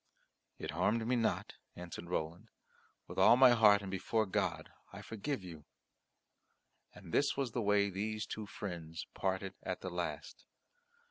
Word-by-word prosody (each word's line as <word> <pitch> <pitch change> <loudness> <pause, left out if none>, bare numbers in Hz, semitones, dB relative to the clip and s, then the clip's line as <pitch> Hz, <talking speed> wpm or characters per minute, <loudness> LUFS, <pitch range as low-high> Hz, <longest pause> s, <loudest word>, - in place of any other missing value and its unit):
"It - - -5
harmed 105 +8 +1
me 125 +2 +2
not," 115 -2 -1 0.2
answered 85 -1 -8
Roland; 90 +5 -3 0.6
"with - - -5
all 120 - +7
my 130 -1 +8
heart 105 -4 +6
and 95 - -5
before 110 +4 0
God 95 - -2 0.2
I - - -9
forgive 115 +1 -4
you." 80 -5 -10 1.3
And 90 -3 -12
this 140 - +2
was 135 -4 -1
the 120 - -1
way 100 -1 +3
these 110 +3 -2
two 105 0 -6
friends 85 -6 -6
parted 95 0 -2
at - - -4
the - - -5
last. - - -5
100 Hz, 150 wpm, -34 LUFS, 90-115 Hz, 1.3 s, my